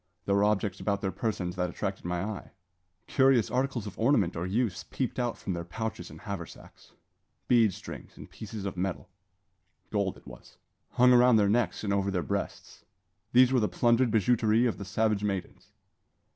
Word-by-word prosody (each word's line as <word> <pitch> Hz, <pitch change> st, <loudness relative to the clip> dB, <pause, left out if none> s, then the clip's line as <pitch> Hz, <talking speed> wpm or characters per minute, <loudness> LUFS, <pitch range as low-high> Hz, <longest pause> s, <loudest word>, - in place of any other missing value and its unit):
There 100 Hz, -, +1 dB
were 100 Hz, +1 st, +3 dB
objects 105 Hz, -2 st, 0 dB
about 100 Hz, -1 st, -1 dB
their 95 Hz, -, -1 dB
persons 95 Hz, -6 st, -3 dB
that 90 Hz, 0 st, 0 dB
attracted 95 Hz, +1 st, -4 dB
my 90 Hz, +1 st, -2 dB
eye. 105 Hz, 0 st, -5 dB, 0.6 s
Curious 130 Hz, -7 st, +3 dB
articles 130 Hz, -3 st, -1 dB
of 100 Hz, -2 st, -9 dB
ornament 110 Hz, -7 st, +2 dB
or 85 Hz, +2 st, -3 dB
use 100 Hz, -2 st, -1 dB
peeped 130 Hz, -1 st, -3 dB
out 120 Hz, -1 st, -1 dB
from 95 Hz, -, -4 dB
their 85 Hz, -1 st, -4 dB
pouches 110 Hz, +6 st, -5 dB
and -, -, -12 dB
haversacks 100 Hz, -6 st, -9 dB, 0.5 s
bead 115 Hz, -4 st, +5 dB
strings -, -, -10 dB
and -, -, -10 dB
pieces 110 Hz, -2 st, -8 dB
of 100 Hz, -, -3 dB
shining 90 Hz, -, -4 dB
metal 95 Hz, -1 st, -3 dB, 0.8 s
gold -, -, -1 dB
it -, -, -19 dB
was -, -, -13 dB, 0.4 s
hung 125 Hz, +1 st, +6 dB
around 125 Hz, 0 st, +6 dB
their 105 Hz, -2 st, +4 dB
necks 115 Hz, +1 st, 0 dB
and 100 Hz, -2 st, 0 dB
over 100 Hz, 0 st, +1 dB
their 90 Hz, -3 st, -1 dB
breasts. 70 Hz, -, -5 dB, 0.5 s
These 130 Hz, +1 st, +6 dB
were 130 Hz, -, +4 dB
the 105 Hz, -, +1 dB
plundered 120 Hz, +1 st, +3 dB
bijouterie 110 Hz, +1 st, +3 dB
of 115 Hz, -, -3 dB
the 100 Hz, -, -6 dB
savage 105 Hz, +1 st, 0 dB
maidens. 100 Hz, -3 st, -4 dB
105 Hz, 185 wpm, -29 LUFS, 95-120 Hz, 0.8 s, hung